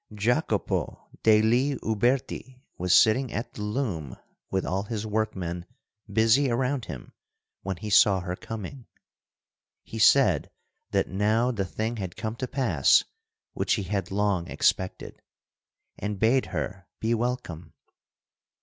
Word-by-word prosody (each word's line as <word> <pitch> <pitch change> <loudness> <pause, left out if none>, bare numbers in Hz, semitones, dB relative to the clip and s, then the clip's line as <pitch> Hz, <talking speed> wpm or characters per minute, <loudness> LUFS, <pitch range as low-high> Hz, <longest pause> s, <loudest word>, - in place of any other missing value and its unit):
Jacopo 110 0 -1
degli 115 +6 +4
Uberti 125 +3 -1
was 90 0 -2
sitting 115 +7 +5
at 115 +3 -4
the - - -8
loom 105 - -3 0.3
with 95 0 -1
all 95 +2 -1
his 110 0 -4
workmen 95 -5 -2 0.5
busy 115 +6 +4
around 125 +1 0
him 60 - -9 0.5
when 95 -2 -4
he 105 +5 -6
saw 100 -1 +6
her 90 0 -4
coming. 115 +5 -8 1.0
He 115 - -7
said 110 - +5 0.4
that - - +1
now 110 +5 +1
the 100 -5 -2
thing 110 +5 -3
had 95 -4 -5
come 110 +1 -3
to 130 - -3
pass 105 - +3 0.5
which - - 0
he - - -3
had 95 -1 -2
long 100 -3 0
expected, 95 0 -1 0.8
and 105 0 -3
bade 125 +4 +3
her 95 -3 -5
be 115 +1 0
welcome. 110 -9 -3
110 Hz, 130 wpm, -26 LUFS, 95-120 Hz, 1.0 s, saw